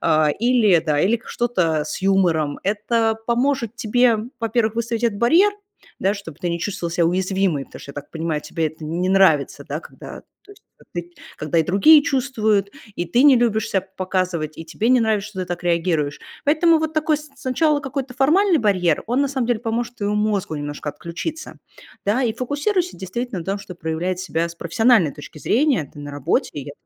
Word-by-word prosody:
а, 155 -2 +3
или, 225 -8 +4
да, 150 -2 +1
или 225 +6 +2
что-то 170 -11 0
с 155 - -6
юмором. 175 -7 +2
Это 220 +2 +1
поможет 240 -1 0
тебе, 240 0 +3 0.2
во-первых, 225 -1 0
выставить 235 0 -2
этот 205 -3 0
барьер, 335 - +4 0.5
да, 195 +2 +2
чтоб 195 -7 -9
ты 180 -1 -2
не 170 - -2
чувствовала 175 -2 -3
себя 170 -1 +2
уязвимой, 185 -4 0
потому - - -13
что, - - -9
я - - -14
так 145 -1 -8
понимаю, 160 -2 -2
тебе 160 +2 -2
это 155 +1 -8
не 175 +4 -2
нравится, 190 -7 +3
да, - - -2
когда, - - -11 0.2
то 405 - -18
есть, 405 - -21 0.3
ты 175 0 -5 0.2
когда 155 +2 -1
и - - +4
другие 245 - +6
чувствуют, 220 -8 0 0.3
и 175 - -1
ты 235 +10 +2
не 280 -3 +7
любишь 225 -2 +1
ся 190 - +2 0.2
показывать, 185 -5 -2
и 165 - -6
тебе 190 +8 -2
не 255 0 +5
нравишься, 215 -2 0
что 190 - -6
ты 185 - -3
так 175 0 -5
реагируешь. 165 -4 0 0.2
Поэтому 320 +3 +4
вот 315 0 -2
такой 310 0 +2
с 300 -1 -11
сначала 290 +3 +1
какой-то 270 -1 -5
формальный 330 +7 +3
барьер, 185 -6 +1
он, 245 +4 +1
на 280 - 0
самом 260 -3 -2
деле, 240 -3 0
поможет 235 +1 -3
твоему 205 0 -1
мозгу 205 -7 -1
немножко 145 0 -5
отключиться, 310 - -7 0.5
да. 220 +6 +1
И 225 - +1
фокусируйся, 335 - -1
действительно, 195 +2 -4
на 165 - -8
том, 195 +1 -2
чтоб 185 -3 -11
проявлять 170 +3 -2
себя 170 -1 -1
с 170 - -10
профессиональной 185 - +3
точки 145 +1 -11
зрения, 235 - +1
ты - - -14
на 145 0 -7
работе. 145 +3 -1
И 145 - -5
я 140 - -7
205 Hz, 195 wpm, -21 LUFS, 170-245 Hz, 0.5 s, не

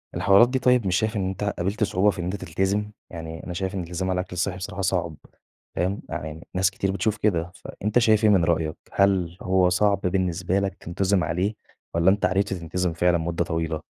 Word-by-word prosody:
الحوارات 100 +5 +5
دي 130 0 0
طيب 125 -5 +3
مش 90 - +1
شايف 110 +2 0
إن 95 -2 0
أنت 95 +1 -5
قابلت 100 +1 -1
صعوبة 100 0 +2
في 100 - -3
إن - - -2
أنت 90 +3 -2
تلتزم؟ 100 +3 -1 0.2
يعني 80 -1 -7
أنا 90 - -6
شايف 95 +2 -3
إن - - -2
الالتزام 90 +2 -3
على 90 0 0
الأكل 90 0 -5
الصحي 90 +1 -1
بصراحة 95 +1 -5
صعب 85 -3 0 0.6
فاهم؟ 95 +3 -1
يعني 80 +2 -6
ناس 95 0 +3
كتير 95 0 -1
بتشوف 105 +3 -1
كده، 90 -5 0
فأنت 105 +5 -1
شايف 110 -2 +3
إيه 110 - +6
من 95 -5 +4
رأيك 80 -2 0 0.2
هل 95 -3 +2
هو 95 -1 +3
صعب 100 +2 +2
بالنسبة 90 0 0
لك 100 -1 -2
تنتظم 95 +2 0
عليه 95 +6 -1 0.4
والّا 85 +2 +4
أنت 100 +2 +2
عرفت 100 +2 +1
تنتظم 90 0 -2
فعلًا 85 +1 +2
مدة 85 +1 -1
طويلة؟ 80 -1 -2
95 Hz, 205 wpm, -24 LUFS, 85-100 Hz, 0.6 s, إيه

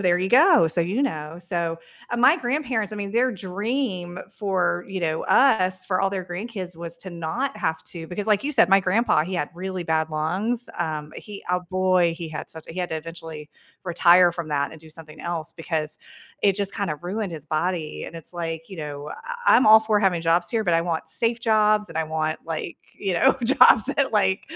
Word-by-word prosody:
there 180 -2 +3
you 185 +1 -1
go, 290 - +6
so, 170 +2 +2
you 195 +11 0
know, 155 - -3
so, 170 -2 -2 0.3
uh, 240 - -2
my 265 +7 +5
grandparents 250 - -2
I - - -5
mean, 200 -1 -4
their 245 +3 +1
dream 190 -1 -3
for, 185 -3 -1
you 190 -1 -4
know, 160 -2 -1
us, 185 -8 +4
for 185 -1 0
all 195 - +2
their 190 -2 -4
grandkids 185 -1 -6
was 170 0 -5
to 185 - -7
not 175 +12 -3
have 160 0 -2
to 165 -2 -7
because 200 +5 -3
like 210 +3 +2
you 295 - -1
said, 225 -7 +5
my 195 0 +6
grandpa, 190 -3 +2
he 185 +1 -5
had 150 -4 -1
really 185 0 -4
bad 160 -1 0
lungs, 195 +11 -1
um, 155 -3 -3
he 205 -2 -10
oh, 180 - +2
boy, 185 -2 +2
he 165 -2 -6
had 155 - -7
such 160 - -8
he 170 +3 -7
had 180 - -2
to - - -2
eventually 160 -1 -8 0.3
retire 175 0 +5
from 170 -2 -6
that 145 -1 0
and 160 - -13
do 160 - -15
something 155 -1 -11
else 170 -2 -3
because 160 -2 -3 0.4
it 200 -2 +3
just 200 -1 0
kinda 200 -8 -2
ruined 195 0 -3
his 155 -2 -6
body, 160 0 -2
and - - -9
it's 165 +1 -7
like, 165 -1 -5
you 190 - -9
know, 150 -1 -6
I 480 - +2
I'm 250 - +3
all 220 0 +9
for 215 -1 +1
having 180 -5 +1
jobs 170 +1 +2
here, 225 -2 0
but 175 -4 +1
I 165 - +3
want 165 -2 -3
safe 230 +6 0
jobs 215 -2 +3
and 160 - -5
I 160 - 0
want, 155 0 -2
like, 165 +1 -4 0.2
you 195 -3 -2
know, 265 +9 +4
jobs 230 -3 +6
that, 275 -4 0
like, 190 -2 +2
180 Hz, 215 wpm, -23 LUFS, 165-210 Hz, 0.4 s, all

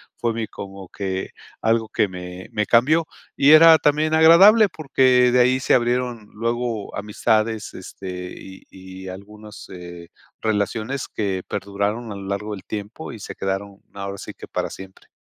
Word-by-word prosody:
fue 115 -1 -1
mi 110 -1 -3
como 95 -1 -9
que 95 -1 -4 0.3
algo 115 0 +1
que 105 - +1
me 90 +1 -9
me 105 -1 0
cambió 150 +10 +3 0.3
y 140 +2 +5
era 160 +1 +9
también 155 +2 +1
agradable 195 +7 +7
porque 130 -5 +3
de 125 - +4
ahí 130 +1 +3
se 130 - +1
abrieron 120 -3 -1
luego 115 -1 -3
amistades, 110 +1 -1
este, 90 -1 -8
y 95 0 -12
y 95 0 -11
algunos, 105 +3 -11
eh, 85 -2 -10 0.3
relaciones 110 +4 -2
que 95 -4 -3
perduraron 100 +3 -3
a - - -8
lo 100 - -8
largo 105 +2 -3
del 95 - -8
tiempo 105 +8 -6
y 115 - -9
se - - -8
quedaron 95 +1 -4
ahora 100 0 -6
sí - - -8
que - - -12
para - - -3
siempre. 95 0 -12
105 Hz, 160 wpm, -22 LUFS, 95-125 Hz, 0.3 s, era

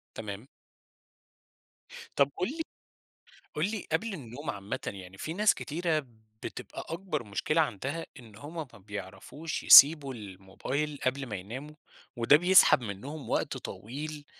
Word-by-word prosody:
تمام. 105 +3 -6 1.7
طَب 140 0 +4
قُل 180 - 0
لي 320 +5 -4 0.9
قُل 175 +8 0
لي 220 - -4
قبل 205 +6 0
النوم 140 -1 -7
عامةً 100 +6 -4
يعني 95 -1 -7
في 160 - -4
ناس 210 +3 +4
كتيرة 155 -2 -2 0.4
بتبقى - - -7
أكبر 165 -5 -3
مشكلة 150 +10 0
عندها 140 +5 -3
إن 110 -4 -14
هم 145 +9 -10 0.2
ما - - -13
بيعرفوش 100 - -6
يسيبوا 140 -2 +9
الموبايل 110 +9 -5
قبل 135 +1 0
ما 105 -4 -5
يناموا 130 +11 -7 0.4
وده 120 +5 +5
بيسحب 180 -6 +6
منّهم 130 +8 -7
وقت - - 0
طويل، 145 +6 -7
140 Hz, 130 wpm, -29 LUFS, 105-160 Hz, 1.7 s, يسيبوا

